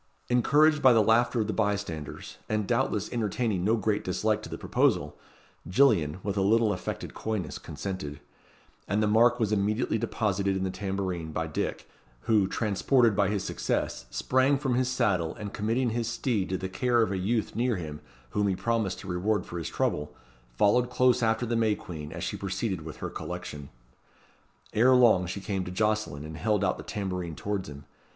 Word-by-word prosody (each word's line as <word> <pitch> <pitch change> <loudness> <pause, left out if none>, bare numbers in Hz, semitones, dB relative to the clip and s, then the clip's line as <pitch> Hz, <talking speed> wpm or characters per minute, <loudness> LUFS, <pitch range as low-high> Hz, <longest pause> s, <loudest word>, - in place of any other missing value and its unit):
Encouraged 150 +5 +4
by 130 -2 +7
the 110 -2 +5
laughter 120 +2 +3
of - - 0
the 110 - -2
bystanders, 100 -8 -3
and 110 -1 0
doubtless 105 -1 0
entertaining 110 -4 -1
no 110 +4 +3
great 110 -2 0
dislike 105 +4 0
to - - -9
the - - -5
proposal, - - +1 0.5
Gillian, 90 - +3
with 100 -1 -2
a - - +2
little 110 +2 +3
affected 90 - -5
coyness, 105 -8 -3
consented; 75 -3 -6 0.7
and 105 +1 +1
the - - +3
mark 120 +3 +4
was 110 -3 +1
immediately 105 +2 +1
deposited 100 -3 0
in 95 - -2
the 95 - -1
tambourine 95 -4 -3
by 80 +1 -2
Dick, 80 - -3 0.3
who, 105 - +3
transported 115 +3 +2
by 100 -1 +2
his 100 -2 -1
success, 65 - -2
sprang 130 - +2
from 135 -2 -1
his 130 +1 +1
saddle, 100 -10 0
and 105 -2 -7
committing 115 +4 0
his 115 0 -1
steed 115 -5 -1
to 95 - -1
the 95 - -4
care 120 +5 +2
of 105 - -1
a 95 - -1
youth 110 +3 -1
near 120 +1 +1
him, 75 -5 -6 0.3
whom 105 0 +1
he 95 - +1
promised 110 -3 -1
to - - -10
reward 95 +2 0
for 85 - -6
his 80 - -4
trouble, 75 0 -2 0.4
followed 120 - +3
close 125 0 +3
after 115 +1 +1
the 120 0 -1
May 110 -2 +2
Queen, 75 -6 -8
as - - -6
she - - -2
proceeded 95 -1 -2
with 80 0 -8
her - - -4
collection. 70 -2 -6 1.0
Ere 125 +4 +5
long 110 -8 +5
she 95 - -4
came 95 -1 -2
to 90 - -6
Jocelyn, 105 -7 -1
and 80 0 -7
held 105 -1 +1
out 95 - +1
the - - -8
tambourine 90 -5 -4
towards 100 -3 -3
him. 70 0 -10
105 Hz, 190 wpm, -28 LUFS, 90-115 Hz, 1.0 s, by